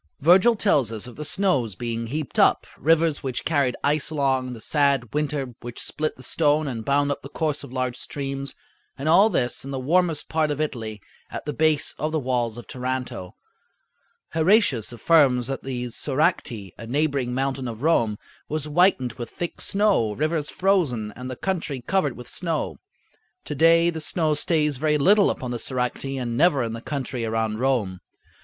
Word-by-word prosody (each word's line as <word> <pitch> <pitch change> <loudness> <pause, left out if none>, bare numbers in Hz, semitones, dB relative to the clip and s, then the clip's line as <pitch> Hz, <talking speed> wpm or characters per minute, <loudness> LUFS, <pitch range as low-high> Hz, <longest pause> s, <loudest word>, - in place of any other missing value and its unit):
Virgil 185 - +5
tells 145 - +2
us 110 0 -5
of 125 - -9
the 150 - -6
snows 145 - 0
being, 115 +2 -3
heaped 150 +2 -3
up, - - +4
rivers 160 +1 +2
which 130 -3 -4
carried 140 -6 +1
ice 145 0 +1
along, 135 -4 0
the 115 - -9
sad 140 -3 +1
winter 145 -4 -2
which 120 0 -8
split 155 0 -2
the 130 - -12
stone 150 +2 +2
and 115 -4 -4
bound 140 +3 +2
up 140 - -3
the 140 - -10
course 150 -1 -2
of - - -10
large 130 -1 -2
streams, 135 0 -4 0.4
and 140 - -4
all 190 +7 +6
this 125 - 0
in 135 - -8
the 135 - -3
warmest 165 +3 +1
part 155 -1 0
of 145 0 -2
Italy, 110 -9 -4 0.3
at - - -7
the 150 - -3
base 155 -2 +2
of 155 +1 -1
the 160 - 0
walls 120 -4 -1
of 120 - -9
Taranto. 125 -7 -4 1.0
Heratius 160 - +3
affirms 125 0 +3
that 135 +1 -4
the 125 -2 -4
Soracte, 130 - 0
a 115 - -8
neighboring 140 -2 0
mountain 135 -1 -1
of 115 +2 -7
Rome, 115 -10 +2 0.3
was 155 -1 -2
whitened 150 - +3
with 120 -2 -7
thick 175 - -5
snow, 195 - +2
rivers 155 +4 -1
frozen, 145 - 0
and 125 +1 -7
the 130 - -4
country 160 -5 -3
covered 145 +1 -1
with 125 - -10
snow. 165 -4 -3 0.7
To - - -4
day 165 +3 +4
the 160 -1 -5
snow 155 +2 +1
stays 150 -2 +1
very 150 +2 +1
little 200 +7 +5
upon 125 -1 -3
the 120 - -3
Soracte 130 +2 -2
and 120 -2 -3
never 145 -2 +3
in 115 -1 -3
the 115 - -6
country 130 -4 -4
around 110 -1 -1
Rome. 120 -8 0
140 Hz, 180 wpm, -24 LUFS, 125-155 Hz, 1.0 s, all